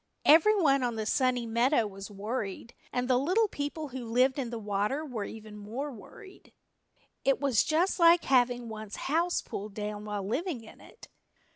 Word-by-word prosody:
Everyone 315 -3 +5
on 240 -2 -1
the 220 -1 -3
Sunny 250 +1 +1
Meadow 235 +2 +2
was 195 0 -8
worried, 210 +1 -5 0.2
and 250 0 -1
the 250 -1 +3
little 370 - +2
people 290 -2 -4
who 260 -1 -6
lived 255 +4 +2
in 250 -3 -2
the 235 - -5
water 210 +7 -1
were 235 -8 -4
even 215 -1 -9
more 230 +8 -5
worried. 380 - -14 0.7
It 275 -1 +2
was 275 -5 +3
just 345 +5 +1
like 335 0 +6
having 245 -2 +2
one's 215 -2 -7
house 335 +5 0
pulled 200 0 -7
down 210 0 -5
while 205 -2 -4
living 275 - -2
in 220 - -15
it. - - -15
245 Hz, 170 wpm, -29 LUFS, 215-290 Hz, 0.7 s, like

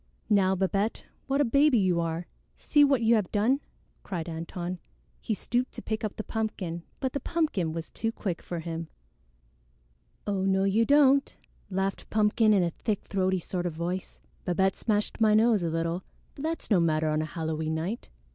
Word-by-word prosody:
"Now, 190 -2 +4
Babette, 195 +3 0 0.2
what 275 +1 +2
a - - +4
baby 275 +2 +4
you 185 -4 +2
are! 165 +1 -2 0.3
See 295 -1 +4
what 275 -4 +3
you 225 +1 +5
have 210 -6 +1
done!" 225 +7 +2 0.4
cried 175 -4 -4
Antone. 175 +2 -5 0.4
He 220 - -2
stooped 245 +5 -1
to - - -7
pick 220 0 -3
up 215 - -2
the 215 - -4
pumpkin, 205 -7 -3 0.2
but 260 -2 -2
the 280 - -1
pumpkin 300 - 0
was 165 0 -6
too 225 - -2
quick 190 -6 -4
for 175 -2 -5
him. 165 0 -5 1.4
"Oh, 200 -2 -1
no, 190 0 +2
you 205 +4 +3
don't," 280 -1 +4 0.3
laughed 195 0 -2
Pumpkin 215 +1 +3
in 195 -3 +4
a 170 - 0
thick 210 +3 -2
throaty 190 -1 0
sort 180 0 -3
of 170 - -4
voice. 175 +3 -4 0.2
"Babette 190 +2 +1
smashed 210 0 -1
my 215 -1 +5
nose 220 -2 +4
a 170 - 0
little, 165 +2 -1 0.3
but - - -10
that's 325 -6 -3
no 195 - +6
matter 155 -2 +2
on 155 0 +1
a - - -1
Halloween 160 -1 -2
night. 180 +9 -4
195 Hz, 185 wpm, -28 LUFS, 170-225 Hz, 1.4 s, no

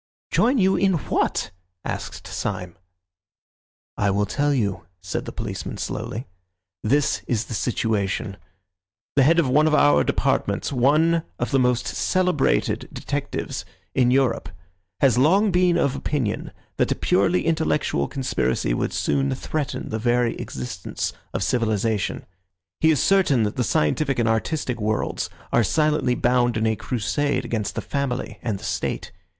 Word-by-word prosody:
"Join 255 +3 +3
you 190 -3 +4
in 195 -1 +3
what?" 165 - 0 0.3
asked - - -5
Syme. 90 -1 -4 1.2
"I 100 - +2
will 100 +1 +1
tell 145 +6 0
you," 100 -10 -1
said 95 0 -4
the - - -5
policeman - - -5
slowly. 115 +5 -4 0.6
"This 140 +6 +1
is 115 -2 0
the - - -7
situation: 105 -4 -1 0.8
The 140 - +5
head 160 +6 +5
of 165 -5 +3
one 150 +5 +4
of 155 - +3
our 145 0 +5
departments, - - 0
one 155 +6 +3 0.2
of 120 - -2
the 135 - +3
most 125 -1 +2
celebrated 180 - +1
detectives - - -4 0.3
in 125 -2 +3
Europe, 130 -7 +2 0.5
has 130 -3 +4
long 190 +9 +4
been 180 -1 +3
of 140 -5 +1
opinion 135 -8 -2 0.3
that - - +1
a - - +2
purely 175 - +2
intellectual 155 - +1
conspiracy 65 - -1
would - - -1
soon 70 -2 0
threaten 145 - -3
the 110 - -2
very 120 +1 +1
existence 65 -1 -4 0.2
of - - -2
civilisation. 110 -3 0 0.5
He 160 - +4
is 155 -4 +3
certain 180 - +3
that 105 0 -1
the 125 - 0
scientific 135 - +1
and 115 -2 +2
artistic 120 +2 -1
worlds 110 +1 -1 0.2
are 120 - +5
silently 150 0 +2
bound 120 -1 +2
in 110 - +1
a 110 0 +2
crusade 130 +5 -1
against 110 -3 -2
the - - -2
Family 135 -3 -3
and 110 -5 -2
the - - -13
State. - - -3
125 Hz, 145 wpm, -23 LUFS, 110-150 Hz, 1.2 s, The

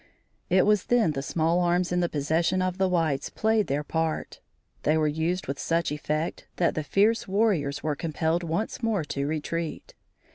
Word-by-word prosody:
It 185 +1 +4
was 210 -2 +3
then 240 -9 +3
the 135 -2 -3
small 165 +4 +1
arms 175 0 +1
in 180 - +1
the 175 -1 +1
possession 160 +5 +1
of 185 0 -1
the 190 - +3
whites 160 -6 0
played 220 -1 +1
their 145 +2 -1
part. 160 +1 -2 0.4
They 155 +1 +2
were 155 -1 +2
used 160 +4 -1
with 140 +1 -4
such 165 -2 0
effect, 150 +2 -3
that 175 - +2
the 155 - -2
fierce 210 +8 +2
warriors 190 -8 +1
were 155 -1 0
compelled 160 +2 -1
once 170 +9 -3
more 220 -7 0
to 140 -1 -3
retreat. 160 +2 -4
165 Hz, 180 wpm, -26 LUFS, 155-185 Hz, 0.4 s, It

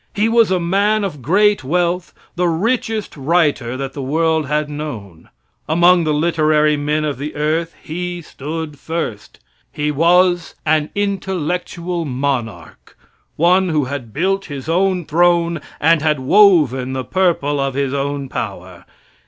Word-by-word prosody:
He 210 +1 +2
was 230 -2 +4
a 185 -1 +1
man 200 +5 +1
of 150 -8 -4
great 200 - +2
wealth, 175 +4 -1 0.2
the 180 0 +1
richest 220 +5 -1
writer 145 -5 0
that 135 0 -5
the 140 - -6
world 160 +2 0
had 150 +1 0
known. 115 - -7 0.4
Among 175 +1 +4
the 155 - +1
literary 155 -1 +2
men 150 +1 -1
of 145 -3 -3
the 150 +2 -5
earth 160 +3 -1
he 175 +2 -4
stood 150 0 -6
first. 160 -11 -5 0.3
He 150 0 -2
was 175 +3 +2
an 155 -1 +1
intellectual 180 -3 -2
monarch 125 - -4 0.4
one 180 +3 +3
who 150 -4 +1
had 130 -4 -6
built 195 - -1
his 140 -3 -7
own 180 +1 +1
throne 170 0 +2 0.2
and 160 0 +3
had 150 -2 +1
woven 135 - +4
the 130 -1 -3
purple 170 -6 0
of 135 -1 -1
his 140 -1 -1
own 140 0 -2
power. 95 -7 -6
155 Hz, 145 wpm, -18 LUFS, 140-180 Hz, 0.4 s, was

